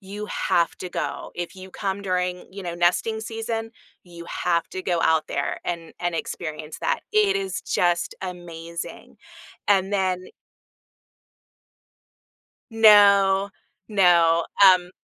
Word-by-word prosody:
you 205 +2 -7
have 170 -4 0
to 180 - -6
go. - - -4
If 175 +1 -5
you 190 0 -11
come 195 +1 -3
during, 180 -1 -2
you 195 0 -9
know, 170 -1 -4
nesting 180 +6 +1
season, 225 0 -4 0.3
you 170 -1 -12
have 170 -1 -1
to 185 - -5
go 175 -2 0
out 160 -1 +2
there - - -2
and 170 -2 -5
and 175 -1 -1
experience 155 -2 -6
that. - - 0
It 420 -2 +3
is 390 -1 -3
just 175 -1 0
amazing. 170 -2 -8 0.5
And 195 0 +3
then 185 -2 0 2.5
No, 200 -3 +6 0.4
no, 170 -5 +4 0.2
um 185 -2 +6
185 Hz, 125 wpm, -24 LUFS, 175-200 Hz, 2.5 s, No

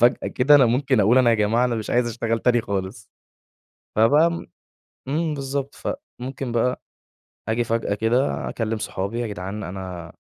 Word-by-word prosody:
فجأة 120 +1 +3
كده 135 +3 +4
أنا 135 -4 +7
ممكن 130 +1 +2
أقول 110 +6 +5
أنا 125 -2 +5
يا - - +4
جماعة 110 +3 +2
أنا 125 - 0
مش 110 -2 -4
عايز 120 0 +2
اشتغل 115 0 -1
تاني 120 +1 +2
خالص. 100 +1 -5 0.9
فبقى 145 +10 +5
م 170 - -5 0.6
إمم، 155 +3 0
بالضبط. 140 -1 -4
فممكن 130 0 -6
بقى 120 +2 0 0.7
أجي 115 +2 +1
فجأة 115 -2 -1
كده، 115 +6 0
أكلم 115 -1 -2
صحابي: 100 +4 -3
"يا 120 - -1
جدعان 100 +1 -5
أنا 90 -2 -7
115 Hz, 165 wpm, -23 LUFS, 105-130 Hz, 0.9 s, أنا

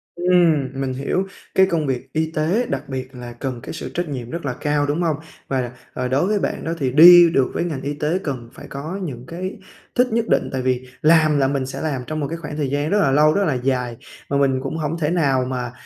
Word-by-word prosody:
Ừm, 175 -6 +3
mình 130 -1 -2
hiểu 140 +8 -1 0.3
cái 190 - +6
công 165 -5 -1
việc 130 -2 -3
y 160 0 0
tế 170 +11 +1
đặc - - -3
biệt 130 0 -5
là 120 -1 -8
cần 125 0 -5
cái - - -6
sự - - -6
trách 175 -2 -2
nhiệm 125 -4 -5
rất 170 +1 -5
là 130 - -1
cao, 145 +2 0
đúng 145 +4 -1
hông? 160 -3 +1 0.3
Và 135 -1 0
đặc 120 0 -5 0.2
à, 125 -1 -2
đối 135 +8 +1
với 210 0 +1
bạn - - -2
đó 165 - -2
thì 130 -3 0
đi 170 +4 +9
được 135 -5 +1
với - - -1
ngành 155 -6 -3
y 145 +1 -3
tế 150 +5 -1
cần 125 -6 -4
phải - - -11
có 155 +8 -5
những 125 -7 -6
cái 185 +5 -5 0.4
thích 250 0 +4
nhất 230 0 +1
định, - - +1
tại 130 - -2
vì 130 0 -1
làm 155 -1 +5
là 135 -1 +3
mình 135 -1 -1
sẽ 130 - -6
làm 145 -5 -2
trong 155 0 -3
một 145 - -1
cái 165 - -4
khoảng 150 -2 -7
thời 145 -3 -1
gian 145 +2 -1
rất 210 - +2
là 140 -8 +3
lâu, 150 +2 +5
rất 200 +3 +2
là 150 - +1
dài. 125 -2 -1 0.3
Mà 140 - +1
mình 135 -2 +2
cũng 135 +4 -4
hổng 155 +1 -2
thể 150 -2 0
nào 140 -7 +2
mà 125 -1 -3
145 Hz, 260 wpm, -21 LUFS, 130-165 Hz, 0.4 s, đi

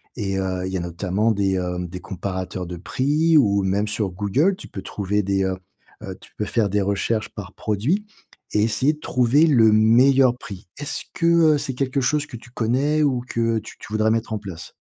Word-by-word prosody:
et 95 -5 -2
heu, 95 -1 -2
il - - -5
y - - 0
a - - -2
notamment 90 +5 -1
des, 100 -2 +1
hem, 90 -1 -3
des 90 +2 -7
comparateurs 95 -1 -5
de 90 0 -7
prix 150 - +2
ou 100 -7 +3
même 100 +2 0
sur 105 -1 -1
Google, 105 - +1
tu - - -11
peux 95 - -7
trouver 100 +1 -2
des 95 0 0
heu 95 0 -2 0.5
heu, - - -7
tu - - -17
peux 105 - -1
faire 105 -1 0
des 100 +1 +1
recherches 100 +3 -1
par - - -9
produit 130 - -1 0.5
et 105 - +3
essayer 120 +7 +2
de 150 - -14
trouver 125 +2 +3
le 115 -7 +5
meilleur 125 +4 +5
prix. 100 -6 -10
Est-ce 145 +1 -4
que, 165 - -2 0.3
heu, - - +1
c'est 135 - -2
quelque 135 +1 -1
chose 150 +3 +1
que 120 - -9
tu 120 - -15
connais 135 +7 +1
ou 130 -4 +1
que 115 -1 0
tu - - -12
tu 105 - -10
voudrais 110 0 +2
mettre 115 0 -1
en 110 - -2
place? 90 -4 -9
110 Hz, 215 wpm, -22 LUFS, 95-130 Hz, 0.5 s, le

